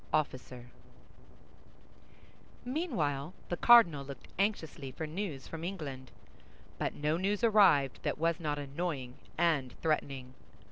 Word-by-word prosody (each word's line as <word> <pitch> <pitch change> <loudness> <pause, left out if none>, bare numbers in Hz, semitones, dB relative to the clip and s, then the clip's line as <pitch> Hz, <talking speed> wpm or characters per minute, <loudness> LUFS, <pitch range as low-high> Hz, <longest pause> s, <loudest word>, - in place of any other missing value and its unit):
OFFICER 125 -4 -2 1.9
Meanwhile, 185 - -1
the 175 - 0
cardinal 175 -13 +7
looked 135 -2 -10
anxiously 160 -9 -1
for 160 +5 -5
news 155 -4 -5
from 165 0 -7
England; 145 -9 -5 0.7
but - - -1
no 150 +2 0
news 200 +4 0
arrived 195 - +5
that - - -1
was 165 +1 +1
not 150 -3 -2
annoying 140 -2 -3 0.2
and 150 -7 +1
threatening. 140 -5 -1
155 Hz, 110 wpm, -32 LUFS, 135-180 Hz, 1.9 s, cardinal